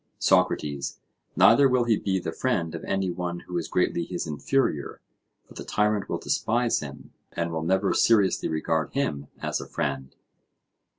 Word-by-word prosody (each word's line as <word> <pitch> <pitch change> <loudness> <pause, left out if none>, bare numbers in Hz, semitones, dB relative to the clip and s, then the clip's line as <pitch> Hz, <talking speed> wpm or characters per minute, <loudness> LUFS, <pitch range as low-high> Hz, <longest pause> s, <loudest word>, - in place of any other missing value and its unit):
SOCRATES: 70 -2 +1 0.4
Neither 140 -1 +6
will 125 -1 +3
he 115 -2 +3
be 95 -2 -1
the 90 -3 -3
friend 85 -6 -1
of 80 - -6
any 95 -2 -1
one 85 0 -4
who 90 - -8
is 85 - -5
greatly 90 -1 0
his 90 +1 -4
inferior, 75 - -1 0.5
for - - -15
the - - -7
tyrant 105 -1 0
will - - -1
despise 120 +1 0
him, 70 -2 -9 0.2
and 85 0 -2
will 80 -1 -2
never 95 +4 +1
seriously 100 -5 +3
regard 80 0 -1
him 75 - -2 0.2
as - - -1
a - - -9
friend. 70 -2 -3
90 Hz, 165 wpm, -26 LUFS, 80-105 Hz, 0.5 s, Neither